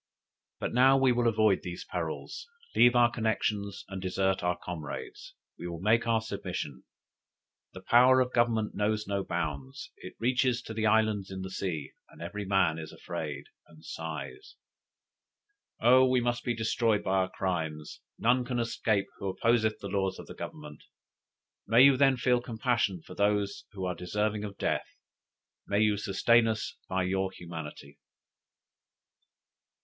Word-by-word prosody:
But - - -3
now 130 +2 +6
we 135 -1 +4
will 120 -1 +2
avoid 110 -3 +3
these 90 -1 -7
perils, - - -5 0.3
leave 120 0 +6
our 120 -1 +5
connexions, 105 -3 -2
and 95 -1 -6
desert 95 +1 0
our 90 0 0
comrades; 80 -5 -7 0.2
we 85 - -5
will 85 -1 -6
make 110 +5 +2
our 115 -1 +2
submission. 95 - -5 0.9
The 95 - -10
power 125 +4 +6
of 130 0 0
Government 115 -2 +1
knows 105 +1 0
no 100 0 -2
bounds; 70 -7 -4
it - - -10
reaches 125 +1 +1
to 110 - -7
the 110 0 0
islands 110 -3 +2
in 95 -1 -6
the 95 - -6
sea, 85 -7 -4 0.2
and - - -17
every 100 +5 -5
man 95 -5 +2
is 80 -1 -8
afraid, 70 -3 -6 0.2
and 80 -1 -18
sighs. 395 - -7 1.2
Oh 130 +3 +6
we 130 0 +3
must 120 0 -1
be 120 - -1
destroyed 110 -1 +1
by 95 +1 +1
our 95 0 +1
crimes, 80 -6 -4 0.2
none 125 +2 +2
can 125 0 -3
escape 110 -3 0
who 100 - -4
opposeth 110 +2 +1
the 100 - -5
laws 95 -1 -1
of - - -10
Government. 75 -1 -8 0.9
May 115 +4 +6
you 140 -1 +7
then 135 0 +4
feel 125 0 +2
compassion 115 -7 -1
for - - -11
those 100 0 0
who 95 -2 -4
are 90 - -1
deserving 105 +4 -2
of 100 -1 -8
death; - - -1 0.8
may 100 - +1
you 105 -1 +3
sustain 115 +3 +3
us 110 -1 -2
by 95 0 0
your 95 +1 -1
humanity!" 80 -5 -9
105 Hz, 155 wpm, -29 LUFS, 95-120 Hz, 1.2 s, you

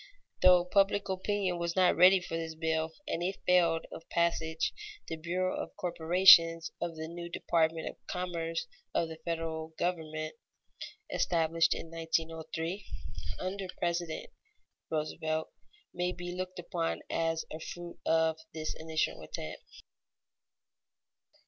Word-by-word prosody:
Though 180 -1 +7
public 200 +2 +2
opinion 190 -1 0
was 170 0 -1
not 185 -1 +5
ready 185 +2 +8
for 175 -2 -5
this 165 -1 -3
bill, 160 0 0 0.2
and 165 - -1
it 185 +3 -1
failed 170 -2 +4
of 165 - -10
passage, 165 -1 +1 0.3
the 165 - -3
bureau 180 +3 -1
of - - -5
corporations 165 -1 +6
of 170 -1 -2
the 160 0 -5
new 170 +1 -6
department 165 -1 +1
of - - -6
commerce 170 0 -2 0.3
of 165 - +2
the 160 - -7
federal 160 -1 -3
government, 155 -3 -2 0.8
established 165 -1 +2
in 165 - -7
1903 165 +2 -2 0.5
under 190 +1 -3
President 170 -2 -2 0.6
Roosevelt, 155 0 -2 0.4
may 180 0 0
be 175 0 -6
looked 185 0 -5
upon 170 -1 -2
as 165 0 0
a 155 - -5
fruit 175 +1 -8
of 160 0 +2 0.2
this 155 -1 -2
initial 160 -1 -1
attempt. 80 0 -8
165 Hz, 125 wpm, -31 LUFS, 160-180 Hz, 0.8 s, ready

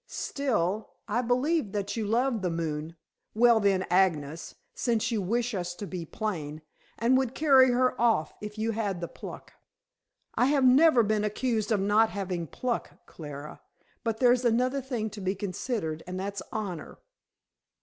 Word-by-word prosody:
Still, 215 -7 -2
I 245 - 0
believed 250 0 0
that 205 -1 -2
you 220 -3 -2
loved 235 +1 +1
the 180 - 0
moon 165 -1 -3 0.4
well, 235 0 +5
then, 195 -3 +2
Agnes, 165 -4 +1 0.2
since 230 -1 0
you 220 -3 0
wish 235 +5 -1
us 180 -2 -3
to 205 - -6
be 180 -4 -6
plain 155 -8 -4 0.3
and 235 +3 +3
would 260 -1 -2
carry 270 -4 +6
her 250 -1 +1
off 225 -10 +2
if 210 0 -7
you 220 +1 0
had 205 -5 -2
the 170 - -4
pluck." - - -10 0.8
"I - - +2
have 275 -2 +3
never 260 0 +6
been 210 0 +1
accused 215 0 -1
of 215 - +3
not 210 +3 +4
having 180 -4 -3
pluck, 240 - -4
Clara. 150 -2 -9 0.4
But 225 -1 -1
there's 245 0 +4
another 250 +3 +2
thing 240 -5 -3
to 210 - -8
be 190 +1 -1
considered, 185 -4 -3
and 185 0 -4
that's 200 0 -4
honor." 190 -7 -5
215 Hz, 160 wpm, -28 LUFS, 185-245 Hz, 0.8 s, carry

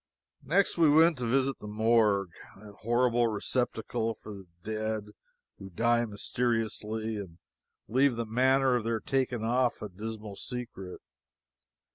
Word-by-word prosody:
Next 170 +6 +1
we 160 -2 +6
went 160 0 +5
to 120 - -2
visit 135 +1 +1
the 105 - -8
Morgue, 105 -3 +2 0.3
that 105 0 -13
horrible 120 +1 +2
receptacle 115 +1 -1
for 105 - -10
the 95 -2 -11 0.2
dead 110 -1 -3 0.5
who 95 - -9
die 120 +5 +2
mysteriously 110 0 -2
and 90 -5 -8 0.5
leave 130 +2 +3
the 115 0 -2
manner 130 +3 +3
of 120 - 0
their 115 0 -1
taking 125 -2 -1
off 120 +2 +1
a 105 - -6
dismal 105 +1 -7
secret. 120 -7 -7
115 Hz, 135 wpm, -29 LUFS, 105-125 Hz, 0.5 s, we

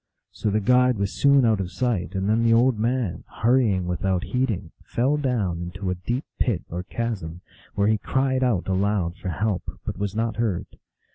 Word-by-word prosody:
So 105 - -2
the 105 +1 +1
guide 125 +2 +4
was 100 -1 -1
soon 140 -2 +4
out 110 -3 +3
of 95 -1 -3
sight, 105 -7 -1
and 95 +1 -1
then 110 +2 +3
the 115 0 +5
old 120 -1 +3
man, 115 -6 -1 0.2
hurrying 115 -7 +3
without 90 +1 0
heeding, 110 -9 -1
fell 130 +5 +1
down 115 - -1
into 90 +2 -4
a - - +1
deep 120 - -3
pit 110 -9 +1
or 90 +2 -3
chasm, 95 -5 -4 0.3
where 100 0 +2
he 110 -1 +2
cried 130 +1 0
out 115 -8 +1
aloud 95 -2 0
for 95 - -5
help, 100 +1 -2
but - - -4
was 100 0 -2
not 115 -1 -1
heard. 110 -7 0
105 Hz, 190 wpm, -24 LUFS, 95-120 Hz, 0.3 s, the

